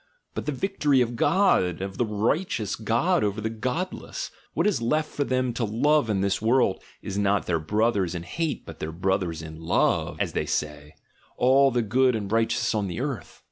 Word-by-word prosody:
but - - -5
the - - +1
victory 150 -3 +1
of 120 -1 +1
God, 145 - +3
of 95 0 -5
the 120 - +3
righteous 110 - 0
God 120 +12 +1
over 105 +1 -1
the 110 +1 -2
'godless'; 130 +12 -4 0.2
what - - +1
is 210 - +1
left 155 +6 0
for 145 - -1
them 130 -2 0
to 120 - -2
love 120 +5 +2
in 100 -3 +1
this 100 0 0
world 115 -3 +2 0.2
is 100 0 -3
not 100 0 +2
their 85 -2 0
brothers 100 0 0
in 85 - -4
hate, 160 - -3
but 80 - -10
their 80 - -4
'brothers 90 -2 -1
in 80 0 -9
love,' 80 +1 +1
as - - -1
they - - -1
say, 75 0 -3 0.4
all 135 +2 +5
the 120 -2 0
good 125 +3 +3
and 105 -2 -4
righteous 115 +1 +1
on 105 -2 0
the 85 - -4
earth." - - -5
110 Hz, 195 wpm, -26 LUFS, 95-130 Hz, 0.4 s, all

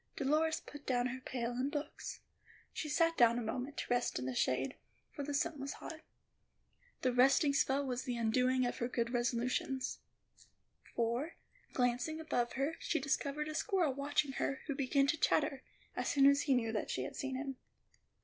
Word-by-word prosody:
Dolores 310 +3 +2
put 290 -1 -12
down 245 -2 +2
her 260 +1 -5
pail 245 -2 -3
and 255 +3 -1
books. 295 0 -5 0.5
She 305 - -3
sat 330 +2 +3
down 235 -1 +6
a - - -1
moment 255 +5 -4
to - - -2
rest 245 0 +1
in 125 - -3
the 130 - -2
shade, 130 - +1 0.4
for 290 - -6
the 290 - -4
sun 295 +1 0
was 275 +1 -4
hot. 315 -1 -8 1.0
That 255 - +3
resting 275 +3 +5
spell 275 0 +2
was 250 -1 -2
the 250 -3 -3
undoing 250 +3 +2
of 245 - -2
her 240 - 0
good 235 -1 -1
resolutions; 245 +2 0 1.0
for, 240 +7 0 0.4
glancing 250 +5 0
above 245 -7 -1
her, 280 +5 -1
she 325 - 0
discovered 280 +2 -1
a 310 - -4
squirrel 340 - +1
watching 280 +1 0
her, 270 0 -2
who 285 - -1
began 275 0 +2
to 310 +3 +1
chatter, 285 -3 +2 0.3
as - - -1
soon 275 -1 +5
as 280 +1 +6
he 275 -3 +3
knew 225 -2 +1
that 215 - -2
she 130 - -1
had 130 - -6
seen 270 -1 -3
him. 270 0 -4
270 Hz, 185 wpm, -35 LUFS, 245-290 Hz, 1.0 s, down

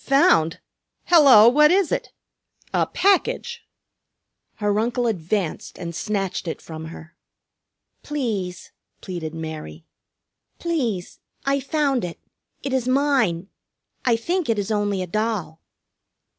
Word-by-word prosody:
"Found? 165 - +4 0.5
Hello, 275 -10 +8
what 300 +5 +6
is 375 -1 +3
it? - - -2 0.6
A - - +2
package!" 435 +4 +1 0.9
Her 205 -1 0
uncle 240 +2 0
advanced 190 -4 -2
and 170 -1 -6
snatched 195 0 -2
it 165 - -3
from 160 -1 -8
her. 165 +1 -11 0.9
"Please," 215 -12 -3 0.3
pleaded 170 -4 -5
Mary, 155 - -7 0.7
"please, 245 - -2 0.3
I 275 0 +2
found 275 -2 0
it. 175 -1 -5 0.5
It 275 - -3
is 255 -2 0
mine. 255 -10 +1 0.5
I 240 -2 +3
think 340 +7 -1
it 225 - +2
is 205 +1 -2
only 205 -3 0
a - - -6
doll." 195 -5 -2
215 Hz, 115 wpm, -23 LUFS, 175-275 Hz, 0.9 s, Hello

